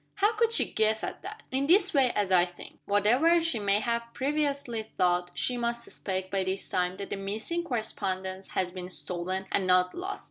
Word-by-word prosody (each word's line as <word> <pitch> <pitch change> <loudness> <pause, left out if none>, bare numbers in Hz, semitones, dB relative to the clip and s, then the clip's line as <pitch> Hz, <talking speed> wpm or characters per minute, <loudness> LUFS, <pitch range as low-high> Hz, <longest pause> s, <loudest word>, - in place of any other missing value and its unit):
_" - - -41
"How 410 +3 +2
could 460 +1 +2
she 460 - +3
guess 220 0 +1
at - - -5
that?" 425 +3 -9
"In 270 +2 0
this 375 +3 +5
way, 265 -4 +4
as 205 -2 0
I 180 -1 +6
think. 175 0 -9
Whatever 245 +12 +4
she 330 -8 0
may 200 0 +2
have 235 0 -2
previously 280 -4 0
thought, 180 -4 0
she 250 - +1
must 235 0 -1
suspect, 190 -4 -4
by 195 -1 +1
this 190 +1 -2
time, 180 0 -1
that 200 - -7
the - - -2
missing 215 +13 -2
correspondence 190 - -3
has 180 -1 0
been 180 0 -7
stolen, 185 +1 -2
and 190 - +1
not 180 0 +4
lost. 380 +3 -4
215 Hz, 205 wpm, -28 LUFS, 185-280 Hz, -, I